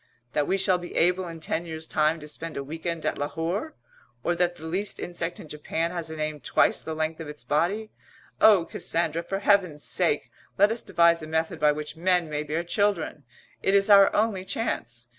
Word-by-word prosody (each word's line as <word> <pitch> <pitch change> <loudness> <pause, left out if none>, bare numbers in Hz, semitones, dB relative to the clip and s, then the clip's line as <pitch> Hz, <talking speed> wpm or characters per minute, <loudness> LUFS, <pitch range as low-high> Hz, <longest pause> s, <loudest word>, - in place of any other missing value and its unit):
That 145 - +1
we 195 - +2
shall 190 -1 +2
be 175 - -9
able 180 +1 +2
in 165 -1 -8
ten 160 +1 -2
years' 160 -1 -5
time 155 +1 +1
to 150 - -8
spend 165 +1 -6
a 140 - -3
week 160 +4 -7
end 170 -2 -3
at - - -1
Lahore? 170 - -3 0.5
Or 175 - +1
that 175 0 +1
the 160 - -11
least 190 +6 -2
insect 175 0 -4
in - - -10
Japan 160 +3 -2
has 170 -2 -3
a 160 - -6
name 155 -1 -3
twice - - +2
the 160 - -5
length 155 +1 -2
of 160 - -6
its 150 0 -9
body? 200 +9 0 0.5
Oh, 200 -6 +7
Cassandra, 165 -1 -1
for 195 +3 -3
Heaven's 195 -7 +2
sake 170 -5 +1 0.3
let 205 +2 +5
us 230 - -1
devise 170 0 +3
a 155 - -7
method 160 +1 -1
by 150 - +5
which 150 0 -5
men 175 -1 +1
may 150 0 -1
bear 155 +3 -2
children! 175 -5 -1 0.4
It 195 - +2
is 200 +1 +4
our 200 -1 +8
only 210 -3 +1
chance. 120 - -3
165 Hz, 210 wpm, -26 LUFS, 155-185 Hz, 0.5 s, our